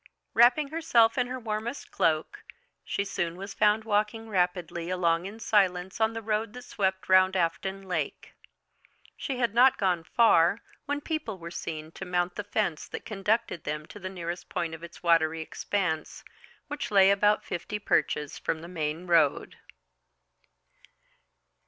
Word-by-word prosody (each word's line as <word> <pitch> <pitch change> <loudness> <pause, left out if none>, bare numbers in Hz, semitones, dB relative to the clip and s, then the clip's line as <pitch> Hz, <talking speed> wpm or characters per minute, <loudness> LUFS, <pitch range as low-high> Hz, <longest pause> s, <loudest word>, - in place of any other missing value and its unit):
Wrapping 250 +5 +5
herself 290 -8 +3
in 250 -2 +1
her 255 +1 -5
warmest 225 +3 -4
cloak, 165 - 0 0.4
she 200 - -2
soon 175 -4 -2
was 195 +2 -7
found 215 +1 +3
walking 215 +1 -1
rapidly 180 -3 -1
along 175 -1 +1
in 215 +3 -9
silence 190 -3 +1
on 220 +1 +3
the 225 0 -5
road 215 0 -1
that 250 0 -9
swept 190 -2 -2
round 185 0 +5
Afton 190 +3 -1
Lake. 180 -6 -4 0.8
She 270 -3 -4
had 235 -4 0
not 255 +3 +6
gone 180 -4 +1
far 185 -2 +4 0.3
when 290 0 -1
people 305 - -3
were 170 -1 -8
seen 155 -2 -6
to 190 - -8
mount 180 0 0
the 205 - -5
fence 205 -6 -2
that - - -7
conducted 210 -3 -1
them 150 0 -4
to 205 - -12
the 185 -1 -5
nearest 175 -1 -6
point 165 -1 -2
of 160 - -8
its 170 - -11
watery 165 -1 +3
expanse, 160 -1 -3 0.4
which 295 -1 -4
lay 195 -2 +6
about 205 +1 +3
fifty 195 +3 -4
perches 150 -7 0
from 160 - -2
the - - -8
main 160 -1 -3
road. 165 -5 +2
190 Hz, 155 wpm, -28 LUFS, 170-220 Hz, 0.8 s, not